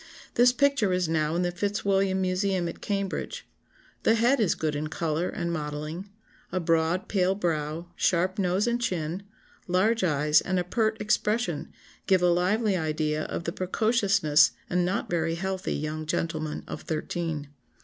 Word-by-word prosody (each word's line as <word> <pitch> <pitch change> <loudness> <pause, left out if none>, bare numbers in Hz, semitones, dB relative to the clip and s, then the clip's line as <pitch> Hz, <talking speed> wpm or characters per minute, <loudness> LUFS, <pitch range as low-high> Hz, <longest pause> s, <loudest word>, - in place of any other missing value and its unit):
This 245 +1 +6
picture 265 -6 +2
is 180 -1 +1
now 155 0 0
in 175 - +1
the 175 - 0
Fitzwilliam 195 0 0
Museum 185 -1 0
at 170 - -7
Cambridge. 200 - -3 0.6
The 225 - +4
head 240 +5 +3
is 210 -6 +2
good 155 -2 -1
in 150 +1 -2
colour 160 +2 -1
and 170 -4 -3
modelling; 150 +4 -4 0.4
a 185 - 0
broad 165 +2 +1
pale 190 -1 +2
brow, 165 -3 -2
sharp 185 +2 +1
nose 185 +1 +1
and 240 0 0
chin, 175 -4 -2 0.5
large 190 +5 +2
eyes, 150 -2 +3
and 185 -1 -1
a 180 - +1
pert 220 +4 0
expression, 210 -4 0 0.4
give 185 -2 +4
a 180 - +5
lively 195 +4 +2
idea 155 -2 -1
of - - -4
the 170 - -2
precocious 190 -5 +3 0.2
and 180 0 +2
not 185 +3 -1
very 165 -1 0
healthy 190 +1 -2
young 155 +1 -4
gentleman 155 -1 -2
of - - -6
thirteen. 155 -2 -3
180 Hz, 160 wpm, -27 LUFS, 160-200 Hz, 0.6 s, This